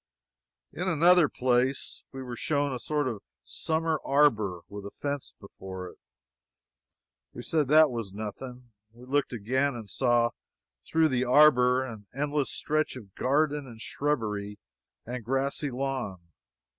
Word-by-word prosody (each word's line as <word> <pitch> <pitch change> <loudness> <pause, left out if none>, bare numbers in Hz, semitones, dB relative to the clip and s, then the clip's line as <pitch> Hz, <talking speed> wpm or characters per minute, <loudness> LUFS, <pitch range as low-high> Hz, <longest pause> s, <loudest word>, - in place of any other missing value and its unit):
In 180 +3 -3
another 170 -1 +5
place 130 +1 0
we 135 -1 -7
were 125 -2 -6
shown 145 +1 0
a 125 - -4
sort 150 +1 -1
of 110 -5 -4 0.2
summer 160 -1 -1
arbor, 110 -11 +2
with 100 0 -8
a 100 - -6
fence 145 +4 -5
before 95 -2 -8
it. - - -17 1.3
We - - -8
said 155 -4 +1
that 155 0 +6
was 115 -5 -4
nothing. 120 +4 -7 0.2
We 120 +2 -14
looked 145 +2 0
again, 130 +4 0
and 115 -3 -7
saw, 120 +2 +2 0.6
through 160 -1 +3
the 130 -1 +1
arbor, 125 -2 +5
an 110 -5 -9
endless 145 0 0
stretch 155 -1 -1
of 105 -7 -11
garden, 145 +1 +1
and 115 -3 -11
shrubbery, 105 -8 -2 0.5
and 125 0 -5
grassy 135 +4 -1
lawn. 130 -6 -3
130 Hz, 140 wpm, -28 LUFS, 115-145 Hz, 1.3 s, that